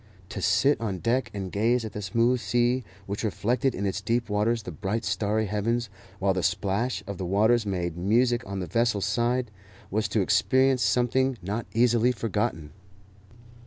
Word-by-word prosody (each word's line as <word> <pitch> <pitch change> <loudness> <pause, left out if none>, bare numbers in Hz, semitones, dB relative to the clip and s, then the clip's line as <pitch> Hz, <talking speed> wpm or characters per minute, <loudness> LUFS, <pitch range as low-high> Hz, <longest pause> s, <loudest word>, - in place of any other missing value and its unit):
To - - -5
sit 140 -2 +3
on 100 -5 -2
deck 120 +5 0
and 95 -3 -5
gaze 115 +3 +1
at 110 - -7
the 105 - -5
smooth 115 +6 +1
sea, 120 +2 +1 0.2
which 100 +3 -4
reflected 120 +5 0
in 100 - -3
its 95 - -2
deep 115 -1 -1
waters 110 +2 +1
the 90 - -6
bright 100 +6 -3
starry 110 +1 0
heavens, 110 +2 -1 0.3
while 95 0 +1
the 90 - -1
splash 100 +8 -1
of 100 -2 -6
the 95 - -2
waters 110 +4 +3
made 90 -4 -2
music 120 +7 +2
on 100 0 -4
the - - -3
vessel's 105 +2 +1
side, 120 +2 0 0.4
was 110 +3 0
to 110 - 0
experience 130 +6 +3
something 125 +4 +2
not 105 +5 -3
easily 120 +1 +4
forgotten. 105 -10 -2
110 Hz, 170 wpm, -26 LUFS, 100-120 Hz, 0.4 s, easily